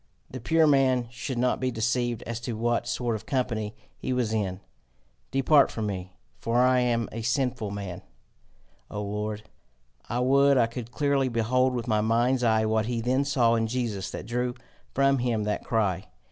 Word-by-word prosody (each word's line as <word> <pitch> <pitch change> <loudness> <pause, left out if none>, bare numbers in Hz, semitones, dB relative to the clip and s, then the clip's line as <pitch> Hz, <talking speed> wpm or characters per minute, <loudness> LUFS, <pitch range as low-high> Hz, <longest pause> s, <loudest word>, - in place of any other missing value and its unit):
The 130 - -6
pure 160 +7 +3
man 135 -4 +3
should 125 +1 -5
not 125 +1 +1
be 130 - 0
deceived 120 0 -1
as 115 0 -4
to 120 0 -4
what 120 +1 0
sort 120 -2 -1
of 110 0 -8
company 115 -5 -1 0.2
he 130 - -2
was 120 -3 0
in! 95 -4 -1 0.7
'Depart 135 +2 +4
from 110 - -4
me, 95 -3 -4 0.3
for 115 +1 -1
I 125 0 +4
am 120 -2 +1
a 115 - -5
sinful 125 -1 -1
man, 100 -3 -6 0.9
O 105 - -5
Lord!' 105 +1 -3 0.7
I 120 - -1
would 140 +2 +4
I 120 - +5
could 115 0 -7
clearly 140 -1 +1
behold 125 +2 +1
with 120 0 -3
my 110 -2 +2
mind's 120 +3 +2
eye 110 -1 +3
what 110 0 +1
he 120 -1 -1
then 130 +4 +1
saw 125 -4 +3
in 115 -1 +1
Jesus 110 -6 -2
that - - -6
drew 120 +2 -2 0.4
from 135 0 +3
him 120 -3 0
that 105 0 -2
cry! 100 -5 0
120 Hz, 180 wpm, -27 LUFS, 110-130 Hz, 0.9 s, I